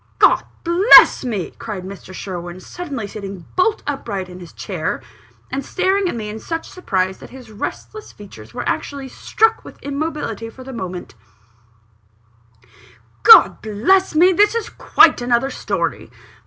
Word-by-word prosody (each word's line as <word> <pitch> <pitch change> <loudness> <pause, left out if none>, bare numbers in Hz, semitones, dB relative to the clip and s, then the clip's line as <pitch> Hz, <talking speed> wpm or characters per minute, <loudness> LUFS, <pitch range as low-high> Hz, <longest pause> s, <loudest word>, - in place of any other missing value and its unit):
"God - - +4 0.2
bless 345 +6 +7
me!" 215 -8 -3
cried 210 -5 -6
Mr. 190 0 -10
Sherwin, 175 -1 -7
suddenly 280 - -6
sitting 200 -2 -8
back - - -23
bolt 420 +4 +1
upright 215 -10 -4
in 180 0 -11
his 175 -2 -12
chair, - - -4 0.5
and 275 +2 -3
staring 380 0 0
at - - -4
me 220 -2 -5
in 215 +1 -6
such 330 +7 -5
surprise, 190 - -2
that - - -12
his 255 -4 -13
restless 430 - -7
features 110 - -13
were - - -5
actually 275 -2 -3
struck 445 - 0
with - - -13
immobility 280 -6 -4
for 255 +3 -13
the 265 +1 -9
moment 185 -5 -7 2.1
"God 180 +9 +8
bless 310 - +1
me, 360 +4 +5
this 415 +5 +3
is 460 -2 -3
quite - - +4
another 245 +2 +1
story. 175 - -3
235 Hz, 150 wpm, -19 LUFS, -, 2.1 s, God